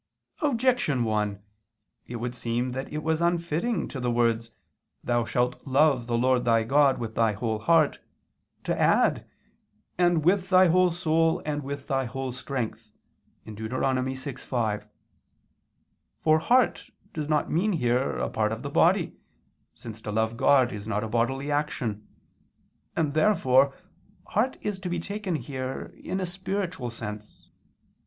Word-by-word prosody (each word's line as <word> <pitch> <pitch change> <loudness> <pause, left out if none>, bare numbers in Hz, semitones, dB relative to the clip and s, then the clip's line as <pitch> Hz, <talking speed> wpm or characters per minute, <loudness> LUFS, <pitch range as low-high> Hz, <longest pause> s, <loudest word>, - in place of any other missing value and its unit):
Objection 245 - +2
1: 105 -3 -1 0.7
It 120 - -6
would 120 +1 -3
seem 120 +1 -2
that 130 +2 -5
it 150 0 -4
was 160 +1 0
unfitting 170 +6 0
to 135 - -6
the 125 -1 -1
words, 115 -1 +1 0.5
"Thou 120 -1 +1
shalt 125 +1 -1
love 135 -3 +3
the 120 -1 0
Lord 125 0 +2
thy 115 -1 +3
God, 135 +3 +4
with 115 -2 -5
thy 110 -2 +2
whole 110 +1 -2
heart," 160 +4 +3 0.6
to - - -1
add, - - +2 0.7
"and 175 -3 +3
with 185 +1 +2
thy 185 -1 +6
whole 180 +2 +4
soul, 165 -1 +1
and 150 -1 -2
with 140 0 -6
thy 135 -1 0
whole 135 +2 -4
strength" 120 -4 -5 0.6
(Deut. 110 0 -6
6:5). 130 -4 -2 1.3
For 155 0 +4
heart 225 -1 +2 0.2
does 150 -1 -4
not 150 -1 +1
mean 195 +6 +1
here 125 -4 0
a - - -1
part 110 0 0
of 115 +3 -5
the 140 - -5
body, 175 +4 +3 0.6
since 110 -2 -10
to 105 - -5
love 110 +2 0
God 130 0 +4
is 105 0 -7
not 105 -1 -1
a - - -3
bodily 135 +6 -1
action: 120 -8 -2 0.9
and 150 -3 0
therefore 140 -6 +3 0.5
heart 240 +6 0
is 205 -2 -3
to 185 -1 -4
be 175 0 -1
taken 200 0 -3
here 130 -1 -5
in 185 +2 -4
a 185 - -1
spiritual 185 -6 -3
sense. 105 -2 -9
135 Hz, 145 wpm, -26 LUFS, 115-165 Hz, 1.3 s, thy